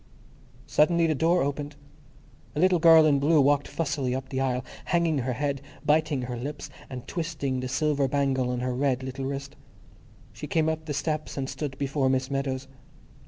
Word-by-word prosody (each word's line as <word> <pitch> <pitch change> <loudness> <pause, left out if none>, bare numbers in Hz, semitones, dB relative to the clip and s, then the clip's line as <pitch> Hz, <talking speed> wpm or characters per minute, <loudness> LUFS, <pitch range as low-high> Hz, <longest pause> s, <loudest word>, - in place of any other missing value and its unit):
Suddenly 170 +2 +3
the 160 - +2
door 165 +4 +2
opened. 145 +1 -3 0.8
A - - -1
little 180 0 +4
girl 160 -1 +8
in 145 -2 +4
blue 150 +3 +4
walked 145 0 +3
fussily 140 -5 -2
up 130 0 -5
the 130 0 -2
aisle, 130 -1 -1 0.2
hanging 170 -4 +1
her 125 0 -1
head, 140 +1 -2 0.2
biting 150 -3 +2
her 125 0 -4
lips, 145 +5 -6 0.2
and 125 -2 -7
twisting 150 -6 -2
the 130 - -3
silver 145 0 +1
bangle 135 -2 0
on 125 0 -2
her 125 0 -1
red 130 0 0
little 130 +1 -5
wrist. 140 +1 -5 0.8
She - - -7
came 160 -1 +1
up 160 0 -3
the 145 -2 -3
steps 155 +1 -2
and 135 -1 -2
stood 140 -1 -5
before 135 -1 0
Miss 130 +1 0
Meadows. 135 -1 -2
140 Hz, 180 wpm, -27 LUFS, 130-155 Hz, 0.8 s, girl